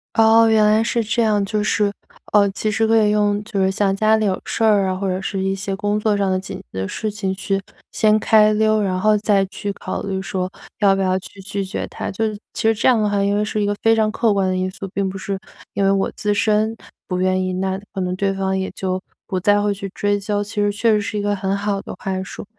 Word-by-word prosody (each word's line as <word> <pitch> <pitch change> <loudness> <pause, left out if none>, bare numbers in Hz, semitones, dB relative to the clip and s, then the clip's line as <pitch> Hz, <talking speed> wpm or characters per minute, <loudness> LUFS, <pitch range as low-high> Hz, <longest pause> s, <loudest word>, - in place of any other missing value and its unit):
哦， 225 0 +6
原 220 -1 +4
来 215 +1 +4
是 230 0 0
这 225 +2 0
样， 210 -2 +2
就 210 +1 -1
是， 210 -1 +1 0.4
呃， 200 -1 +5
其 215 +2 -2
实 220 +1 +1
可 225 0 +4
以 210 - +2
用 205 -1 +1
就 205 -3 -2
是 190 - +3
像 195 0 +1
家 215 +2 +3
里 220 - 0
有 190 -2 0
事 230 - -2
儿 205 -3 +4
啊， 185 - -1
或 195 +1 -3
者 185 +1 -1
是 195 0 -3
一 195 - 0
些 195 0 -3
工 205 +2 -1
作 210 -1 +1
上 195 -1 +1
的 185 - +1
紧 190 - -7
急 - - -12 0.2
的 95 - -2
事 215 -1 -3
情 200 -2 -3
去 195 0 -2 0.3
先 215 -1 +3
开 215 0 +5
溜， 215 0 +2
然 185 -2 -1
后 215 +2 +4
再 200 -2 +2
去 200 +1 -5
考 - - -5
虑 195 -1 -3
说 185 -1 -3 0.3
要 200 -2 +4
不 195 - -1
要 185 0 +1
去 195 - -14
拒 195 +1 -3
绝 190 - -4
他， - - -5
就 215 +2 -1 0.2
其 - - -4
实 225 0 +4
这 220 - 0
样 245 -3 +5
的 210 - +2
话 200 -1 +1
因 200 +1 +1
为 210 - +1
是 215 0 -2
一 205 - +1
个 205 - 0
非 225 0 +5
常 215 -1 +2
客 220 -2 +2
观 195 -2 +1
的 185 - 0
因 185 0 -1
素， 195 - -7
并 195 -1 0
不 190 - -5
是 195 0 -3 0.4
因 200 - 0
为 195 - +4
我 195 0 +1
自 210 -1 0
身 215 +1 +1 0.3
不 180 -1 -2
愿 185 0 +2
意， 185 - -2
那 190 +1 -2
可 195 - -3
能 180 0 -1
对 195 +1 0
方 190 0 -1
也 190 - -3
就 185 -1 -2 0.3
不 185 - -1
再 205 +2 +3
会 205 0 +1
去 195 0 -6
追 205 0 0
究， 205 0 -1
其 205 +2 -11
实 205 0 +2
确 225 +3 +1
实 210 - +3
是 205 +1 -3
一 - - -1
个 205 0 0
很 195 0 -1
好 200 0 -1
的 - - -7
话 190 -1 -3
术。 195 - -8
205 Hz, 290 characters per minute, -20 LUFS, 195-215 Hz, 0.4 s, 哦